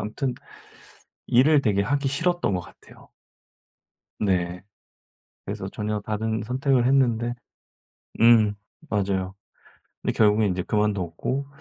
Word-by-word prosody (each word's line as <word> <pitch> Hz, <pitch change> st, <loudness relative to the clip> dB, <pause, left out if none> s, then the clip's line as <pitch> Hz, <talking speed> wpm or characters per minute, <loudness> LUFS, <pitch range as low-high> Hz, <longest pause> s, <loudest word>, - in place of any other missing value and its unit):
암튼 120 Hz, +5 st, -3 dB, 0.9 s
일을 140 Hz, +4 st, +4 dB
되게 100 Hz, -3 st, +2 dB
하기 140 Hz, +5 st, 0 dB
싫었던 170 Hz, -, 0 dB
것 90 Hz, -, -1 dB
같아요. -, -, -17 dB, 1.1 s
네. 90 Hz, -3 st, -1 dB, 0.8 s
그래서 -, -, -5 dB
전혀 105 Hz, 0 st, -3 dB
다른 110 Hz, +1 st, -2 dB
선택을 130 Hz, +1 st, +1 dB
했는데 120 Hz, -3 st, +2 dB, 0.9 s
음 115 Hz, -3 st, +6 dB, 0.3 s
맞아요. 95 Hz, -2 st, -1 dB, 0.7 s
근데 -, -, -1 dB
결국에 105 Hz, -1 st, +3 dB
이제 90 Hz, -1 st, -1 dB
그만뒀고 105 Hz, -, -1 dB
110 Hz, 225 characters per minute, -24 LUFS, 100-130 Hz, 1.1 s, 음